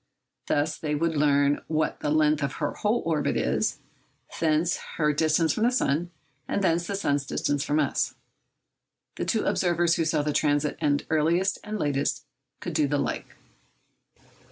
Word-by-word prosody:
Thus 150 +2 0
they 150 -1 -1
would 165 +2 0
learn 145 -1 +3
what 155 0 -1
the 150 - -2
length 155 0 +3
of 140 0 -1
her - - -2
whole 220 +3 0
orbit 155 -3 0
is, - - 0 0.6
thence 160 +2 +2 0.2
her 150 -2 +2
distance 160 +1 +2
from - - -4
the 235 - +4
sun, 175 - 0 0.4
and 200 - -1
thence 175 -1 +1
the 200 - -2
sun's 145 -8 0
distance 145 +1 -1
from 150 +1 +1
us. 145 -3 0 1.0
The - - -2
two - - 0
observers 175 -1 +2
who 165 - +1
saw 155 -2 +1
the 150 0 -1
transit 145 0 +1
end 145 -1 +1
earliest 170 +5 +2
and 215 0 -4
latest 145 -2 -1 0.4
could 175 - -4
do 155 -2 +2
the 145 +1 0
like. - - -3
155 Hz, 165 wpm, -26 LUFS, 145-170 Hz, 1.0 s, the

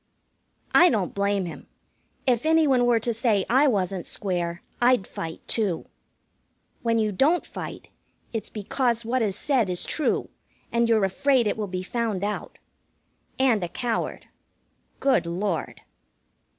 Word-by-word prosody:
I 355 - +8
don't 205 -7 -1
blame 200 -1 0
him. 170 - -8 0.6
If 245 -4 +2
any 320 0 +4
one 255 -4 +3
were 235 -2 +4
to 235 +1 -1
say 220 -4 +1
I 270 +5 +4
wasn't 190 -6 0
square, 175 -3 -3 0.2
I'd 245 -5 +4
fight, 165 -1 -7
too. 205 -7 0 1.0
When 230 -1 +1
you 215 -1 +1
don't 290 - +2
fight, - - -8 0.4
it's 225 - -3
because 235 +2 -1
what 250 +2 0
is 205 -4 0
said 250 -4 +1
is 180 -1 -2
true, 310 - 0 0.4
and 235 0 +2
you're 220 -3 +4
afraid 255 +6 +2
it 210 - +1
will 215 -2 -3
be 185 -1 -4
found 220 -2 -2
out. 210 0 -4 0.8
And 245 -7 +3
a - - -1
coward. 235 +4 -2 0.7
Good 260 -11 +2
Lord! 175 -2 -2
220 Hz, 145 wpm, -25 LUFS, 190-245 Hz, 1.0 s, I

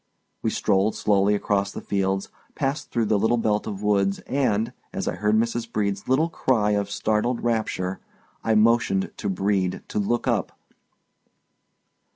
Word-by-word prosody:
We - - 0
strolled 100 +3 +1
slowly 100 0 +3
across 100 -1 0
the - - -6
fields, 95 -1 -1 0.3
passed 140 0 -2
through 115 -1 0
the 105 -1 +2
little 115 +4 +2
belt 110 -2 0
of 105 -1 -5
woods 100 -1 +2
and, 115 -6 0 0.2
as - - -4
I - - 0
heard 105 +4 +1
Mrs. 115 +1 0
Brede's 100 -2 -1
little 135 +6 +3
cry 115 -9 +1
of 100 -1 0
startled 110 +4 0
rapture, 110 -5 -1 0.4
I 110 - +2
motioned 110 -3 +3
to - - -2
Brede 95 -1 0
to - - -1
look 120 +4 0
up. - - 0
105 Hz, 155 wpm, -24 LUFS, 100-115 Hz, 0.4 s, slowly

